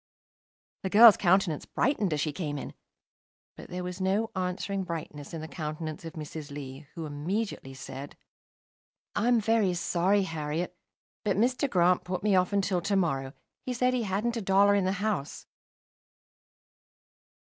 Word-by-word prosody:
The 190 - -2
girl's 220 +2 +9
countenance 185 -4 +2
brightened 235 - +1
as 150 - 0
she 150 +1 0
came 150 -3 -3
in; - - -6 0.8
but - - -11
there 180 0 -4
was 180 +1 -5
no 200 +4 +1
answering 185 +1 -2
brightness 155 -4 -6
in 165 - -5
the 160 - -6
countenance 155 +1 -5
of 165 - -7
Mrs. 155 -1 -7
Lee, 140 0 -8
who 165 - -5
immediately 150 -1 -3
said 135 +1 -8 1.0
"I'm 235 +3 +3
very 215 -4 +2
sorry, 185 +3 +2
Harriet, 160 +1 -3 0.5
but 200 -2 +1
Mr. 250 +5 +2
Grant 180 -3 +3
put 185 +1 -4
me 210 -2 +3
off 185 +1 +3
until 195 -3 +1
to 200 +3 0
morrow. 135 -8 0 0.3
He 255 - -3
said 250 +1 +2
he 250 - +1
hadn't 220 +3 -1
a - - -2
dollar 195 +1 +4
in 200 -2 +2
the 190 - +1
house." 205 -10 -2
180 Hz, 155 wpm, -29 LUFS, 155-205 Hz, 1.0 s, girl's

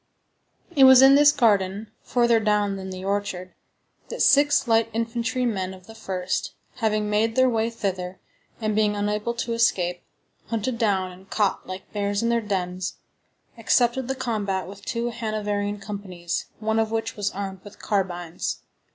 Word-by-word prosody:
It 270 -2 +7
was 260 0 +9
in 270 0 +8
this 290 +1 +7
garden, 210 -6 +1
further 235 -2 +2
down 210 -2 +1
than 190 -1 -6
the 185 0 -7
orchard, 195 -2 -3 0.6
that - - -1
six 285 -2 +4
light 225 0 +3
infantry 235 +2 -1
men 190 -5 -2
of 185 -1 -17
the 225 - -12
1st, 185 -4 -3 0.2
having 215 -3 0
made 215 +2 +1
their 260 0 +5
way 225 -2 +1
thither, 190 -5 -4 0.4
and 215 -2 -1
being 210 -1 +2
unable 210 +3 -1
to 235 0 -2
escape, 180 -6 +1 0.5
hunted 230 +1 -2
down 195 -5 +1
and 185 +2 -16
caught 205 -3 0
like 185 +1 -8
bears 205 +1 -1
in 230 - +1
their 235 0 +2
dens, 185 -3 -3 0.6
accepted 240 +1 +2
the 265 - -2
combat 205 -7 -2
with 200 +1 -11
two 235 0 -2
Hanoverian 210 -2 -2
companies, 190 -4 -5
one 220 0 0
of 220 -1 +1
which 225 0 -2
was 205 -1 -1
armed 190 -1 -6
with 205 0 -13
carbines. 175 -5 -2
210 Hz, 160 wpm, -24 LUFS, 190-230 Hz, 0.6 s, was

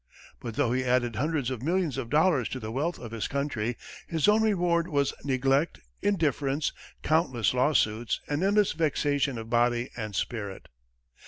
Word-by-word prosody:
But 115 -2 -6
though 130 -3 +1
he 130 +1 +1
added 125 -2 +1
hundreds 145 -2 0
of 125 -3 -4
millions 170 0 0
of 130 -3 -4
dollars 150 -4 +3
to 130 - -4
the 110 -2 -6
wealth 150 +8 -1
of 120 -3 -9
his 115 -2 -3
country, 125 -5 -2 0.3
his 160 0 +1
own 210 +1 +5
reward 175 -5 +2
was 140 -5 +1
neglect, 135 +3 +1 0.2
indifference, 150 -6 0 0.3
countless 130 - +2
lawsuits 120 -4 +1
and 145 +2 -1
endless 205 +1 +3
vexation 145 -4 0
of 115 0 -7
body 120 0 +2
and 110 -4 -5
spirit. 105 -3 -4
135 Hz, 160 wpm, -28 LUFS, 120-160 Hz, 0.3 s, own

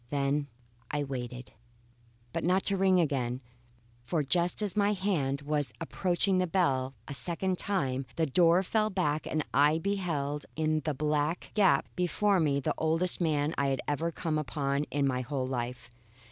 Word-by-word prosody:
Then 140 0 0 0.4
I 150 -1 -1
waited. 125 -2 -6 0.8
But 165 - -2
not 185 +3 +2
to 200 - +3
ring 190 -1 +4
again; 130 -6 0 0.6
for 150 +5 0
just 175 +8 +2
as 205 -1 -2
my 205 0 +3
hand 155 -9 -1
was 145 -1 -1
approaching 185 +3 +1
the 180 - +1
bell 135 -8 +1
a 145 - -5
second 180 +5 -2
time, 135 -10 -1
the 165 - +1
door 170 +5 +4
fell 215 +2 +1
back 155 -6 -1
and 155 -1 -1
I 145 +4 +4
beheld 165 -6 -2
in 155 0 +1
the 155 -2 -1
black 150 +3 -1
gap 190 -10 +3
before 185 +3 +2
me 145 -4 +2
the 140 - -1
oldest 165 +3 +2
man 155 -2 +1
I 140 - +2
had 135 -1 0
ever 160 +3 -1
come 160 -2 -2
upon 140 -1 -1
in 145 -1 -1
my 130 -2 0
whole 130 0 -3
life. 125 -1 -4
155 Hz, 165 wpm, -30 LUFS, 140-180 Hz, 0.8 s, ring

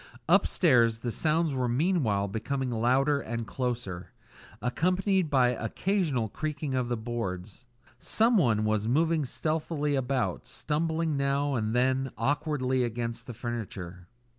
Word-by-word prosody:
Upstairs, 125 - +4
the 120 - -2
sounds 155 +6 +1
were 130 -2 0
meanwhile 120 - +1
becoming 130 +5 -2
louder 130 +5 +2
and 115 0 -4
closer, 115 -8 -4 0.5
accompanied 180 - +1
by 130 -4 +4
occasional 130 - -1
creaking 150 +4 -4
of 125 -2 0
the 120 - 0
boards. 110 -2 -5 0.3
Someone 160 - +3
was 110 0 0
moving 160 +4 +2
stealthily 155 +1 -1
about, 130 - -1
stumbling 155 - -1
now 140 +1 +1
and 110 -2 -1
then 130 +2 +2
awkwardly 130 0 0
against 115 0 -3
the 125 - -6
furniture. 100 -7 -6
130 Hz, 120 wpm, -28 LUFS, 115-150 Hz, 0.5 s, Upstairs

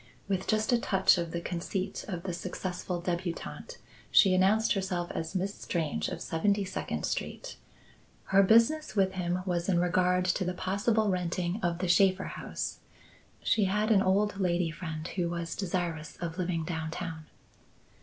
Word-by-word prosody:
With 190 -1 -1
just 215 +1 +1
a 240 - +4
touch 190 -4 +3
of 170 -1 -2
the 170 +1 -3
conceit 185 +3 -3
of 180 -4 -4
the 185 -2 -3
successful 180 0 -4
debutante, 175 - -4 0.3
she 190 -2 +6
announced 195 +4 +4
herself 180 -3 -2
as 160 +3 -4
Miss 190 +2 -1
Strange 165 -7 -2
of 175 -2 -5
Seventy 200 +5 +1
second 185 - -3
Street. - - -4 0.8
Her 195 - +8
business 230 +9 +4
with 190 -2 +3
him 180 -1 -2
was 175 -1 -1
in 180 - +3
regard 180 +1 +2
to 185 +1 +1
the 180 0 -2
possible 205 +4 +1
renting 180 +1 -1
of 170 -1 0
the 185 +1 -2
Shaffer 185 +2 +4
house. - - -4 0.6
She 210 -3 +3
had 210 +3 +1
an 200 -3 +5
old 200 +1 +2
lady 175 -3 +1
friend 160 -2 -5
who 175 -3 -1
was 170 -1 -3
desirous 170 -5 -3
of 170 +1 -5
living 170 -3 -1
downtown. 160 -1 -4
185 Hz, 160 wpm, -30 LUFS, 170-195 Hz, 0.8 s, Her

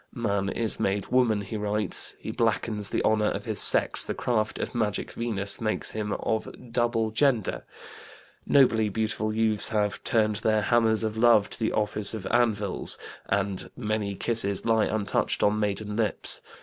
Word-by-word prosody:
"Man 100 -5 -1
is 115 0 -1
made 100 0 -1
woman," 120 -5 +2
he 100 +2 -6
writes; 105 -2 0
"he - - -6
blackens 105 -3 -1
the - - -1
honor 110 -1 +2
of - - -5
his - - -2
sex, - - +6
the - - -4
craft 110 -3 -1
of - - -4
magic 110 -4 -2
Venus 105 -4 -2
makes 110 -1 -1
him 105 -1 -4
of 110 -1 -2 0.2
double 115 -2 0
gender"; 120 -2 0 0.8
nobly 115 -6 +3
beautiful 110 +1 -2
youths 110 -1 +2
have 105 -2 -1
"turned 110 -2 +1
their 110 0 +1
hammers 115 -1 +2
of 110 0 -3
love 115 -3 +4
to - - -4
the 110 - 0
office 105 0 -1
of 100 -4 -7
anvils," 110 -5 0 0.3
and 100 -1 -2
"many 105 -4 -2
kisses 100 -3 0
lie 115 -1 +3
untouched 105 -2 -1
on 105 +1 +2
maiden 105 0 -2
lips." 110 -2 0
110 Hz, 160 wpm, -26 LUFS, 105-115 Hz, 0.8 s, sex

